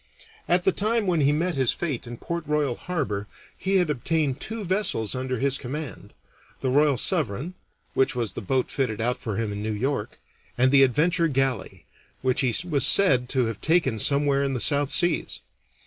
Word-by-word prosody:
At 175 0 +3
the 190 - +3
time 215 +3 0
when 175 -4 +1
he 140 +1 +4
met 170 +4 0
his 130 -3 +3
fate 145 -8 -3
in 120 0 -7
Port 170 +5 -4
Royal 150 -4 0
Harbor 120 - -3 0.3
he 195 +1 -1
had 180 -5 +3
obtained 150 0 -1
two 220 -1 -5
vessels 185 - 0
under 130 0 -3
his 135 +2 0
command 145 +2 -7 0.5
the 130 - 0
Royal 145 0 +3
Sovereign, 155 - -1 0.4
which 135 +1 +1
was 115 -5 -2
the - - -6
boat 130 +5 -1
fitted 125 -6 -2
out 120 +3 -1
for 110 -4 -4
him 115 -2 -2
in 100 - -5
New 110 +1 -2
York, 130 0 -3 0.4
and 130 +1 +3
the 140 -1 +6
Adventure 165 +6 +3
galley, 130 - -2 0.4
which 130 0 +1
he 125 -4 +1
was 145 -6 +1
said 135 -7 +4
to 130 -3 +1
have 115 -2 -5
taken 160 -9 +1
somewhere 140 +2 +3
in 135 -1 -1
the - - -2
South 145 +2 +2
Seas. 175 0 +1
135 Hz, 190 wpm, -25 LUFS, 125-165 Hz, 0.5 s, the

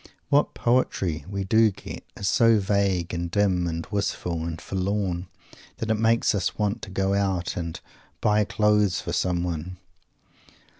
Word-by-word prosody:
What 145 +1 +3
"poetry" 95 - 0
we 100 -1 -2
do 110 +3 +4
get 95 - -9
is 100 - -2
so 115 +4 +5
vague 95 -4 0
and 85 0 -2
dim 90 -2 +1
and 85 0 -3
wistful 90 -5 -2
and 85 -1 -4
forlorn 95 -1 -2 0.5
that 110 -1 -2
it 110 - +1
makes 115 +1 +3
us 100 -4 -1
want 105 0 -1
to - - -7
go 95 +1 0
out 95 -2 0
and 85 -2 -4 0.4
"buy 105 0 +3
clothes" 105 -2 +2
for - - -4
someone. 90 -1 -1
95 Hz, 150 wpm, -25 LUFS, 90-105 Hz, 0.5 s, so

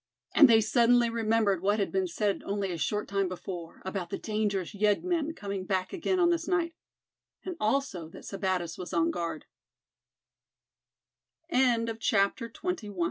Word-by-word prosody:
And 285 -4 +8
they 225 -1 +6
suddenly 235 +1 +4
remembered 220 -5 +1
what 205 +2 +2
had 200 - -1
been 190 -1 0
said 200 +3 -1
only 200 -1 -2
a 170 - -3
short 210 +5 -1
time 195 -1 0
before, 175 -2 -7
about 190 -2 -3
the - - -3
dangerous 210 -3 -2
yeggmen 305 - +1
coming 200 -2 -4
back 185 -1 -1
again 370 +1 0
on 345 -1 +4
this 340 0 -1
night. 345 -2 0 0.7
And 370 -2 -4
also 215 - -1
that - - -12
Sebattis 185 -4 -2
was 180 - -6
on 165 -1 +2
guard. 170 -3 -4 2.1
CHAPTER 230 -4 +2
XXII. 230 - -17
THE 365 - 0
NIGHT 360 -9 -2
ALARM. 185 - -10
210 Hz, 160 wpm, -29 LUFS, 190-240 Hz, 2.1 s, And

